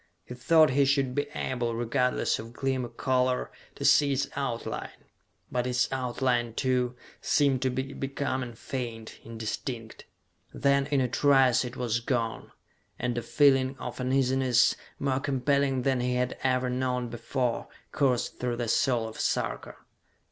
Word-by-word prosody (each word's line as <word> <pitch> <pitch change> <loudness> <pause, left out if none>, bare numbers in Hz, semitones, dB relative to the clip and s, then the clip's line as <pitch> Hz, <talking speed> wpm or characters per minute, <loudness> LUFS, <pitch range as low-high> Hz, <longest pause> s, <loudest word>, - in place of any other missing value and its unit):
He - - -8
thought 155 +3 +4
he 140 +2 +4
should 135 -2 +1
be 145 +2 -1
able, 120 -3 -2
regardless 125 +2 0
of 115 +1 -9
gleam 130 0 -1
or 120 - -5
color, 125 +1 0 0.2
to - - -4
see 145 -1 +5
its 135 +1 0
outline; 130 -4 -3 0.6
but 125 0 0
its 125 0 +1
outline, 125 -2 -1
too, 125 -1 0 0.3
seemed 140 -3 +2
to 130 - +1
be 130 +2 -3
becoming 130 -2 -3
faint, 115 -2 -6
indistinct. 115 +1 -6 0.5
Then, 140 0 +2
in 140 -2 +1
a 130 - +1
trice, 130 -1 +4
it 125 0 -6
was 120 -2 0
gone, 115 -2 -2 0.5
and 120 -1 -2
a 120 - -1
feeling 135 +2 +3
of 125 +1 -6
uneasiness, 130 -1 +3 0.2
more 135 -1 0
compelling 135 -1 +1
than 130 -1 +1
he 125 0 0
had 125 0 0
ever 130 -1 +1
known 125 -1 -1
before, 120 +1 -2 0.2
coursed 130 -4 0
through 125 -1 -1
the 120 -2 -2
soul 120 -2 +2
of 110 - -9
Sarka. - - -2
125 Hz, 150 wpm, -28 LUFS, 120-135 Hz, 0.6 s, see